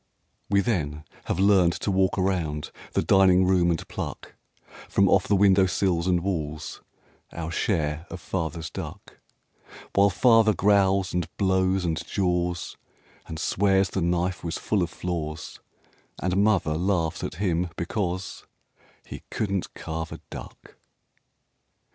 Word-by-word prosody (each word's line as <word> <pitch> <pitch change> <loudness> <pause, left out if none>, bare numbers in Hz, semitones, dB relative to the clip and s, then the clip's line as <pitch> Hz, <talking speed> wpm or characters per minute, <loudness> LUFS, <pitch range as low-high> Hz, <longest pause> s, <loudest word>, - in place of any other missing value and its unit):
We 100 0 +4
then 75 -9 -2 0.2
have - - -2
learned 95 -3 +4
to 100 - -2
walk 95 0 +2
around 85 -6 -1 0.2
the - - +1
dining 95 -1 +5
room 90 -2 +3
and 85 -2 -2
pluck - - -6 0.6
From - - +3
off - - +3
the 105 - +3
windowsills 95 -2 +3
and 90 -2 +2
walls 80 -5 -4 0.5
Our 85 -1 -5
share 80 -4 -1
of 95 - -7
Father's 80 -4 -4
duck - - -8 0.7
While 100 +1 +5
Father 110 +3 +4
growls 95 -1 +3
and 90 -2 -1
blows 95 -1 +1
and 80 -1 -1
jaws 90 -2 -1 0.5
And 80 - -6
swears 95 +1 +2
the 95 - -1
knife 90 +2 0
was 85 -1 -3
full 105 -3 0
of 85 - 0
flaws 80 -2 -5 0.6
And 90 0 -1
Mother 100 -7 +2
laughs 85 -1 0
at - - -4
him 90 -1 0
because 90 0 -3 0.6
He - - -8
couldn't 100 -4 -2
carve 80 0 -5
a - - -7
duck. - - -11
90 Hz, 135 wpm, -25 LUFS, 85-95 Hz, 0.7 s, dining